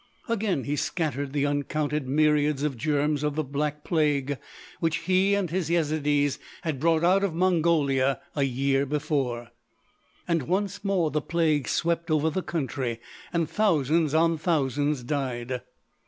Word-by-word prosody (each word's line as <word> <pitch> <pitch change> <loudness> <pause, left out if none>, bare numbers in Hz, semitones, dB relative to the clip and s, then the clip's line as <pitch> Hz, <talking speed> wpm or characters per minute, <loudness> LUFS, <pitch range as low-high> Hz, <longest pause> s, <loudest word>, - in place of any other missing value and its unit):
Again 210 - 0
he 145 - -1
scattered 145 -4 -2
the 145 0 0
uncounted 145 0 -1
myriads 150 0 +2
of 150 -3 0
germs 145 +3 0
of 150 -1 -1
the 155 - 0
Black 150 +2 -3
Plague 145 -4 0 0.4
which 165 -2 +1
he 190 +2 +3
and 190 -5 -1
his 175 -3 -1
Yezidees 150 -4 +1 0.2
had 155 -6 -2
brought 165 +2 +2
out 190 +3 +4
of 185 -5 -1
Mongolia 160 -7 +2 0.2
a 145 - 0
year 135 +1 +1
before; 135 -5 -1 0.8
and 165 -6 0
once 195 +3 -1
more 185 -6 +1
the 150 - 0
plague 155 -4 +1
swept 170 0 0
over 155 0 +2
the 190 - -1
country, 130 -8 -3 0.3
and 170 -2 0
thousands 160 -5 +2
on 165 0 +3
thousands 145 -4 0
died. 125 -2 -3
150 Hz, 145 wpm, -26 LUFS, 140-165 Hz, 0.8 s, out